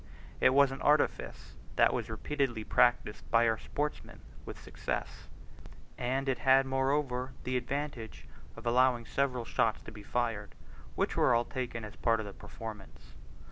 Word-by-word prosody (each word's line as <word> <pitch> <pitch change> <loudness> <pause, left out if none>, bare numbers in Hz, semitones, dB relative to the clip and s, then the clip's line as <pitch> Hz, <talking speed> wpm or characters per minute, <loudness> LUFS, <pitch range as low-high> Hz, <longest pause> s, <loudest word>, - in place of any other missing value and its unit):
It 130 - +4
was 140 -1 +6
an 135 - -6
artifice 150 +1 +1 0.2
that - - +4
was 115 -2 -3
repeatedly 120 +1 -2
practised 120 -1 +2
by 115 0 +4
our 110 -1 +1
sportsmen 150 +1 -4 0.3
with - - -7
success, - - -5 0.7
and 130 +3 -1
it 135 - 0
had 135 0 +5
moreover 135 -1 0
the 130 - -2
advantage 125 - -4 0.3
of 115 - -11
allowing 120 0 +3
several 125 -3 -1
shots 115 -3 +1
to - - -9
be 105 -1 -11
fired, 110 -2 -2 0.4
which - - 0
were 125 - +4
all 120 +1 +2
taken 120 -3 -4
as 105 - -10
parts 115 -2 +2
of - - -6
the 100 - -8
performance. 110 -2 -10
125 Hz, 155 wpm, -31 LUFS, 115-135 Hz, 0.7 s, was